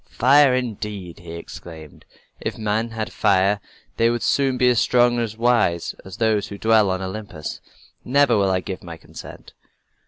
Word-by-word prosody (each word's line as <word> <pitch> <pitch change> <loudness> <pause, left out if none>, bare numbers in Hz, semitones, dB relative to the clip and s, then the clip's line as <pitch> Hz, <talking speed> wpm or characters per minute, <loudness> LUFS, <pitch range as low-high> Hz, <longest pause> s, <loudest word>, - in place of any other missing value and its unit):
"Fire, 135 +1 +5
indeed!" 105 -7 -5
he 85 -1 -10
exclaimed. 80 -2 -10 0.3
"If - - -4
men 110 +1 -1
had 110 -1 -5
fire 100 +1 +2 0.4
they 115 0 +3
would 120 0 -1
soon 135 -2 +1
be 125 - +3
as 120 -2 +3
strong 120 -1 +3
and 115 -3 -2
wise 115 -8 +1
as 95 0 -11
we 110 -2 +2
who 100 - -7
dwell 110 -1 +3
on 95 0 -2
Olympus. 95 -5 -6 0.4
Never 140 -1 +3
will 100 -2 +2
I 95 -1 +1
give 95 -1 -7
my 85 -2 -8
consent." - - -12
110 Hz, 165 wpm, -22 LUFS, 95-120 Hz, 0.4 s, Fire